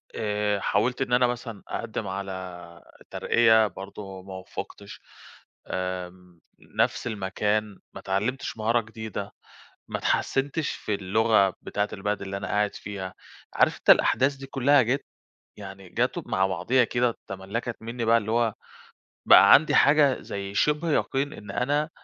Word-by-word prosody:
آآ 105 -1 -1
حاولت 120 +8 0
إن 125 -2 -1
أنا 125 0 +5
مثلًا 115 -3 -5
أقدِّم 110 -2 -4
على 95 -3 -7 0.2
ترقية 110 -2 +4
برضه 95 -1 -9
ما 95 0 -10
وُفِّقتش 100 +2 -8 0.7
آمم، 90 -1 -5 0.2
نَفس - - -1
المكان 105 0 -2
ما - - -8
اتعلّمتش 105 +7 -2
مهارة 115 +2 +2
جديدة، 110 -2 -7 0.6
ما - - -2
اتحسّنتش 140 +3 0
في 105 - -4
اللغة 100 +1 +3
بتاعة 105 0 -2
البلد 105 0 -2
اللي 100 0 -4
أنا 95 - -5
قاعد 105 0 0
فيها، 95 -2 -6 0.4
عارف - - +3
أنت - - -4
الأحداث 135 +2 +3
دي 135 0 -10
كلّها 140 +1 +4
جات، 130 +5 -1 0.5
يعني 95 -2 -10
جات - - -1
مع 95 0 +1
بعضها 95 +8 +2
كده 120 0 0
تملّكت 100 +5 -5
منّي 115 +1 -4
بقى 115 +1 +5
اللي 110 0 -5
هو 115 -2 +2 0.7
بقى - - +8
عَندي 155 +2 +5
حاجة 145 -2 +4
زي 100 0 -6
شِبْه 150 +7 +1
يقين 140 0 0
إن 105 -2 -9
أنا 145 +7 0
105 Hz, 140 wpm, -26 LUFS, 95-125 Hz, 0.7 s, بقى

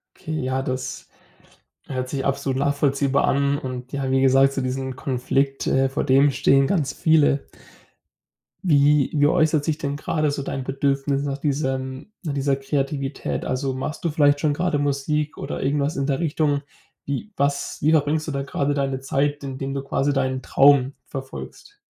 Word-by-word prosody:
Okay, 155 0 -4
ja, 130 +1 -1
das 130 -1 -4 0.8
hört 130 -2 -3
sich 135 -2 -3
absolut 135 -1 -1
nachvollziehbar 140 0 +1
an 140 +1 +2
und 130 -1 -6
ja, 135 -1 -2
wie 135 0 +3
gesagt, 135 +1 +5
zu 135 - -2
diesem 130 0 -3
Konflikt 135 +2 -1
äh, 135 0 +3
vor 135 - -2
dem 135 +2 +5
stehen 135 0 +3
ganz 150 -6 0
viele. 155 -3 +3 1.2
Wie 145 -3 +4
wie 145 -1 +4
äußert 155 -1 +2
sich 155 -2 0
denn 145 -3 -3
gerade 155 0 0
so 145 - -3
dein 135 -1 -4
Bedürfnis 140 +1 0
nach 140 -1 -2
diesem 135 +3 -3
nach 155 -5 -3
dieser 140 0 +1
Kreativität? 135 0 -2
Also, 130 +1 -2
machst 135 +6 -5
du - - +3
vielleicht 145 -2 +3
schon 150 0 +1
grade 155 -1 0
Musik 145 +2 -1
oder - - -5
irgendwas 140 +2 0
in 140 - 0
der 135 -2 0
Richtung. 150 -3 +1 0.4
Wie 140 +10 -4
was 140 0 -1
wie 155 - +3
verbringst 155 0 +2
du - - -2
da 140 -1 -2
grade 140 +1 -1
deine 135 -2 -1
Zeit, 145 +2 -1
indem 135 0 -4
du 135 -1 -3
quasi 140 +1 0
deinen 130 -1 0
Traum 135 0 +4
verfolgst? 135 - -8
140 Hz, 170 wpm, -23 LUFS, 135-145 Hz, 1.2 s, gesagt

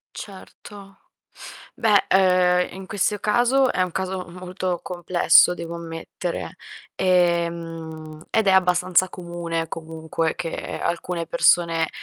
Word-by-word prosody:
Certo. 195 0 -11 0.8
Beh, 215 -4 +3
uhm, 180 -1 +4
in 190 0 -8
questo 205 +1 -1
caso, 245 +5 +2
è - - -1
un 185 -1 0
caso, 190 0 -4
molto 180 0 -4
complesso 175 0 +4
devo 170 -1 -7
ammettere, 170 +1 -6 0.4
ehm, 165 -3 -1
ed 220 -1 +1
è - - +6
abbastanza 185 0 +3
comune, 170 -2 -4
comunque, 160 0 -3
che 165 - -5
alcune 170 0 -3
persone, 165 0 +2
180 Hz, 110 wpm, -23 LUFS, 165-190 Hz, 0.8 s, è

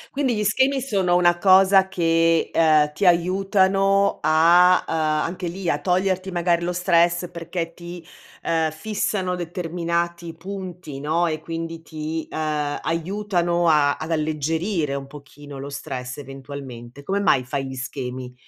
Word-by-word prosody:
Quindi 265 -3 +1
gli 210 - -1
schemi 265 +6 +2
sono 195 -9 +1
una 175 -1 +3
cosa 190 +1 +5
che, 165 -2 +2
ehm, 155 -2 +3
ti 200 - -2
aiutano 195 +2 +2
a 170 +4 +5
uhm, - - -3
anche 160 +3 -1
lì, 175 0 -4
a - - 0
toglierti 185 +1 0
magari 170 -1 +1
lo 175 - -1
stress 175 0 +2
perché 170 0 -5
ti, 175 0 -9 0.4
uhm, 160 -1 0
fissano 190 +1 -2
determinati 170 0 -3
punti, 180 -4 -8
no, 165 +4 +1
e 155 -1 -3
quindi 165 0 -6
ti, 160 0 -5
uhm, 150 -2 -2
aiutano 175 0 -1
a 150 -3 +3
ad 160 +1 -6
alleggerire 155 +1 -1
un 140 - -5
pochino 145 0 -12
lo 140 +1 -6
stress, 130 -3 -6
eventualmente. 135 -2 -9
Come 195 +6 -1
mai 135 -10 +3
fai 135 +2 -4
gli 130 - -7
schemi? 130 -1 -6
170 Hz, 145 wpm, -22 LUFS, 155-185 Hz, 0.4 s, cosa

